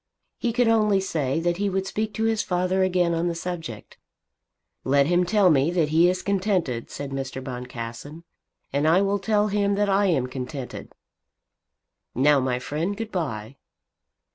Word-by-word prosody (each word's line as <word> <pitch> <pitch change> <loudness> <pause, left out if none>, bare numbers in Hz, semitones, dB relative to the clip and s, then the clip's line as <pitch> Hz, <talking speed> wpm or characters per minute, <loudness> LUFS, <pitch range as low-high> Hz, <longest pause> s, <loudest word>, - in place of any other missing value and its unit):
He 240 - 0
could 245 +1 +2
only 215 -3 +3
say 155 -7 -1
that 175 0 0
he 200 +1 0
would 190 0 -1
speak 215 +2 -2
to 220 - -1
his 225 -1 +1
father 180 +1 0
again 180 -2 +2
on 165 +1 0
the 170 - -2
subject. 165 -10 -6 0.9
"Let 140 +1 +3
him 175 +3 +2
tell 200 -3 +4
me 140 +1 +3
that 170 -4 +1
he 165 +3 +5
is 185 0 -2
contented," 185 - -1
said 140 -1 -6
Mr. 135 -1 -4
Boncassen, 125 +3 -7 0.5
"and 145 +2 +1
I 175 +5 +4
will 200 +1 0
tell 210 +1 +1
him 200 0 +1
that 205 0 +1
I 200 +1 +3
am 145 -9 +1
contented. 130 +1 -7 1.2
Now, 145 +3 +4
my 130 -1 0
friend, 160 +10 -3
good 225 -1 -5
bye." 135 - -4
175 Hz, 165 wpm, -24 LUFS, 140-200 Hz, 1.2 s, he